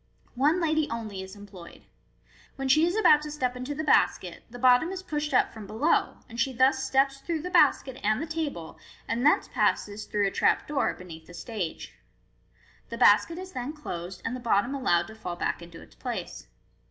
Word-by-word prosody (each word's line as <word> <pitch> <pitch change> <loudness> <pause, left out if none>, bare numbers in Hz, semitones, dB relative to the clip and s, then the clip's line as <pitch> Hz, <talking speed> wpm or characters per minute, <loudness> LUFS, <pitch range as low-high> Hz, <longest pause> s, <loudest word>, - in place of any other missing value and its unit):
One 295 +8 +2
lady 315 -2 +1
only 215 -4 -5
is 190 +1 -9
employed. 195 -4 -13 0.7
When 270 -1 -3
she 310 +5 +5
is 350 - -1
about 300 -9 +5
to 300 - -6
step 255 -4 -2
into 255 +3 -5
the 315 - -3
basket, 185 - +2
the 245 - -10
bottom 250 +5 +4
is 375 -1 -6
pushed 300 -3 -3
up - - +2
from 215 -3 -9
below, 225 +11 +1
and 235 -1 -9
she 265 +2 +1
thus 265 +2 +3
steps 270 +1 +2
through 315 +2 -3
the 360 - -5
basket 265 -6 +3
and 215 +2 +2
the 315 - -3
table, 310 - -5 0.3
and 230 +2 -1
thence 295 - +4
passes, 205 +1 0
through 205 -1 0
a 195 - 0
trap - - +2
door, 290 -2 0
beneath 165 -3 -11
the 175 - -12
stage. 195 -3 -5 1.0
The - - -5
basket 335 - +5
is 375 +1 -8
then 255 +1 -5
closed, 185 - -7
and 225 - -2
the - - -6
bottom 235 +1 +1
allowed 175 -11 +1
to 220 - -11
fall 180 -5 -6
back 175 - -2
into 170 -1 -11
its - - -18
place. - - -6
255 Hz, 200 wpm, -27 LUFS, 205-300 Hz, 1.0 s, she